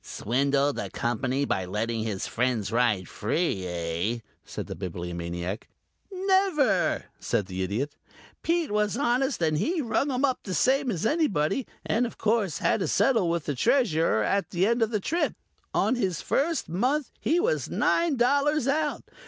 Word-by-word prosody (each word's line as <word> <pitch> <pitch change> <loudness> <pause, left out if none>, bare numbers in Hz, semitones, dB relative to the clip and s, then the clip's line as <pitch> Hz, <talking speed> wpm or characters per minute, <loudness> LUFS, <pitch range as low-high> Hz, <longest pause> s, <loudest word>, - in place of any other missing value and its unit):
"Swindled 140 +4 0
the 100 - -3
Company 125 +6 -1
by 95 - 0
letting 110 +5 -2
his 105 -4 -2
friends 120 -4 -1
ride 115 -6 +2
free, 105 - -1
eh?" 85 +6 -2 0.3
said - - -6
the - - -6
Bibliomaniac. 85 +2 -5 0.4
"Never," 370 - +2
said 105 - 0
the 95 0 -5
Idiot. 115 +11 -2 0.5
"Pete 335 -4 0
was 210 +1 +1
honest 255 - +1
and 155 -1 +2
he 340 - 0
rung 280 +1 0
'em 260 +2 +2
up 260 -2 0
same 260 +8 +2
as 195 -2 -2
anybody 225 - +1 0.2
and 240 +3 +1
of - - -11
course 215 -6 +1
had - - +1
to 185 - -1
settle 225 - +3
with 170 -2 -1
the 145 - -1
Treasurer 160 - +2
at 200 - 0
the 180 +1 +1
end 235 +2 +1
of 225 - +3
the 215 -2 0
trip. 335 - -1 0.4
On - - +2
his 190 -10 -1
first 325 +3 0
month 255 - 0
he 335 +3 +2
was 465 +7 0
nine 335 -3 +2
dollars 280 +3 +2
out. 295 +1 0
185 Hz, 160 wpm, -27 LUFS, -, 0.5 s, settle